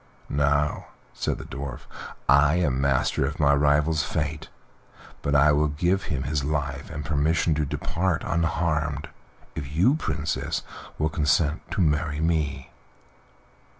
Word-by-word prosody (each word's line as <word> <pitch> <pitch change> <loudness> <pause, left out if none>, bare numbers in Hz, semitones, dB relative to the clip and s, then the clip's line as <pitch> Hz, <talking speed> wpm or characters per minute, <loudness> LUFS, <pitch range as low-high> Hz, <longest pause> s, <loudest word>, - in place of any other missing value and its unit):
"Now," 70 +1 +1 0.3
said - - -2
the - - -8
Dwarf, 70 -2 -6 0.5
"I 70 +3 +5
am 70 -7 +1
master 70 -1 +1
of - - -5
my 70 -2 +4
rival's 75 +2 +3
fate, 75 -1 -3 0.7
but 70 - 0
I 75 +2 +6
will 75 +1 +3
give 85 +6 0
him 65 -3 -2
his 70 +1 -1
life 70 -1 -2
and 75 -3 -6
permission 80 +3 +1
to 75 0 0
depart 85 +4 -1
unharmed 80 -3 0 0.4
if 75 -2 -6
you, 95 - +4
Princess, 155 - -2 0.3
will 75 - +1
consent 75 +1 +1
to - - 0
marry 75 -1 +1
me." 75 -4 -1
75 Hz, 135 wpm, -25 LUFS, 70-80 Hz, 0.7 s, I